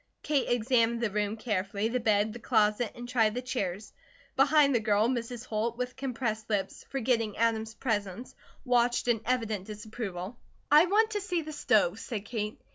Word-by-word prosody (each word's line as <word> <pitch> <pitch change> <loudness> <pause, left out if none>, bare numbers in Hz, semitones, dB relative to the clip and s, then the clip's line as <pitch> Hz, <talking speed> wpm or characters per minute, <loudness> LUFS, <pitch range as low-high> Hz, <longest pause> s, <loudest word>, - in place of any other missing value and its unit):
Kate 290 -3 0
examined 235 -1 +2
the 230 -3 -1
room 210 +1 -1
carefully, 205 -2 -1
the 250 +2 -1
bed, 215 -1 +2
the 240 - -8
closet, 215 -1 +2
and 240 0 -8
tried 225 -3 +2
the 250 - -2
chairs. 205 -5 -3 0.4
Behind 280 +1 +5
the 235 - +3
girl, 215 0 +2
Mrs. 240 -1 -3
Holt, 225 +1 -2
with 250 0 -3
compressed 240 -5 -3
lips, 195 -3 -2
forgetting 230 -5 0
Adam's 225 -1 0
presence, 210 -1 -3 0.3
watched 245 -1 +2
in 230 -3 +2
evident 225 -6 -1
disapproval. 210 -1 -6 0.3
"I 305 +4 +7
want 435 +4 +3
to 415 -1 -2
see 360 -4 -2
the 310 0 -7
stove," - - +2
said 215 -4 -5
Kate. 210 -1 -4
230 Hz, 170 wpm, -29 LUFS, 215-250 Hz, 0.4 s, I